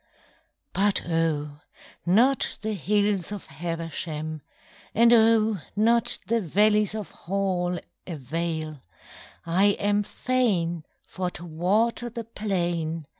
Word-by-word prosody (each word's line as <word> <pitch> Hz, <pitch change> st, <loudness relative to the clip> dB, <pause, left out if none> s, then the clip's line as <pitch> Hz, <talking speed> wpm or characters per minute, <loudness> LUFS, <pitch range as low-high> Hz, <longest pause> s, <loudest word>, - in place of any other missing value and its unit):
But 200 Hz, -2 st, +1 dB
oh, 155 Hz, -3 st, 0 dB, 0.5 s
not 245 Hz, +9 st, +3 dB
the 220 Hz, 0 st, -1 dB
hills 205 Hz, +1 st, 0 dB
of 205 Hz, -2 st, -6 dB
Habersham, 160 Hz, -2 st, -4 dB, 0.5 s
And 235 Hz, +2 st, +6 dB
oh, 220 Hz, -2 st, +4 dB, 0.2 s
not 230 Hz, +2 st, +3 dB
the 230 Hz, 0 st, +1 dB
valleys 210 Hz, +4 st, +3 dB
of 215 Hz, -3 st, -5 dB
Hall 180 Hz, -1 st, -1 dB, 0.3 s
Avail: 155 Hz, -1 st, -3 dB, 0.6 s
I 175 Hz, +4 st, +3 dB
am 205 Hz, 0 st, +2 dB
fain 195 Hz, -9 st, 0 dB, 0.2 s
for 185 Hz, -1 st, -3 dB
to 175 Hz, -1 st, -9 dB
water 205 Hz, +9 st, +1 dB
the 230 Hz, 0 st, -6 dB
plain. 175 Hz, -7 st, -2 dB
190 Hz, 105 wpm, -26 LUFS, 165-215 Hz, 0.6 s, And